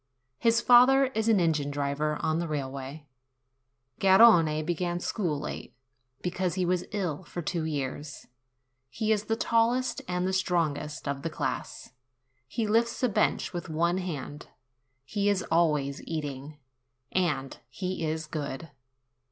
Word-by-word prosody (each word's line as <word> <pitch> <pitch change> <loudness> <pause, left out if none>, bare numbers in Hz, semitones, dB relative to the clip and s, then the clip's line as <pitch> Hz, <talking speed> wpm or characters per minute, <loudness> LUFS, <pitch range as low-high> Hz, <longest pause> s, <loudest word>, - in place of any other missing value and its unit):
His 230 0 +3
father 255 +3 +7
is 220 +1 0
an 215 -3 +5
engine 155 -4 +1
driver 145 +1 -1
on 160 +1 0
the 170 - -2
railway. 140 0 -5 0.9
Garrone 190 -6 +6
began 175 +1 -1
school 175 -6 -2
late, - - -7 0.5
because 180 0 -1
he 185 -1 0
was 180 0 0
ill 185 -7 -2
for 175 0 -6
two 160 +1 -2
years. 145 -1 -4 0.6
He 215 - -1
is 210 -1 +1
the 225 - 0
tallest 235 +3 +1
and 180 0 -1
the 190 - -1
strongest 155 -6 -1
of 140 -1 -2
the 165 - -2
class; 140 -3 -4 0.5
he 220 - -2
lifts 230 +3 +1
a 250 - +4
bench 200 - +1
with 175 0 -5
one 170 +3 +1
hand; 150 -5 -6 0.6
he 205 +4 0
is 195 -3 +1
always 150 -4 +2
eating; 145 -1 -5 0.5
and 150 -8 -1
he 185 +5 -4
is 160 0 -2
good. 145 0 -5
170 Hz, 140 wpm, -28 LUFS, 150-190 Hz, 0.9 s, father